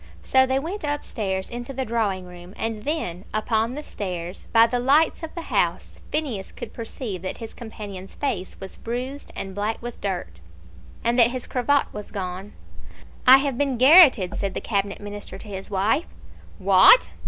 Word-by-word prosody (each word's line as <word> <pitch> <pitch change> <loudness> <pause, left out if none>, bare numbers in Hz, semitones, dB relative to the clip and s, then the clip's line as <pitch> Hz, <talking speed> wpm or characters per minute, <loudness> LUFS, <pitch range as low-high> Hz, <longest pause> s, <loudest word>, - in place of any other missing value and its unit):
So 260 0 +4
they 260 +1 +1
went 335 +8 -4
up 290 0 -2
stairs 190 -4 -3
into 240 +3 -6
the 265 0 -2
drawing 210 -5 -1
room, 180 +1 -12
and 225 -1 -4
then 195 - -2
upon 220 +2 0
the 300 - -5
stairs, 180 -7 -6
by 230 0 +7
the 245 +2 -1
lights 285 +8 +3
of 320 0 -7
the 335 - -5
house, - - 0
Phineas 270 -11 -2
could - - -8
perceive 225 -4 -6
that 185 - -5
his 225 -2 -8
companion's 205 -5 -9
face 205 -10 -3
was 190 - -9
bruised 255 +5 -5
and 195 0 -5
black 205 +3 -2
with 240 0 -8
dirt, 175 - -4 0.6
and 235 +2 +2
that 235 -1 +7
his 255 0 -4
cravat 275 +3 +1
was 210 -1 -7
gone. 190 +1 -5 0.7
"I 260 +1 +11
have 270 -4 -2
been 275 -3 +1
garrotted," 260 - +7
said 195 -2 -3
the - - -1
Cabinet 200 -2 -2
Minister 205 -2 -7
to 210 - -11
his 195 -2 -7
wife. 195 - +1 0.5
"What?" 195 - +6
225 Hz, 175 wpm, -24 LUFS, 195-260 Hz, 0.7 s, I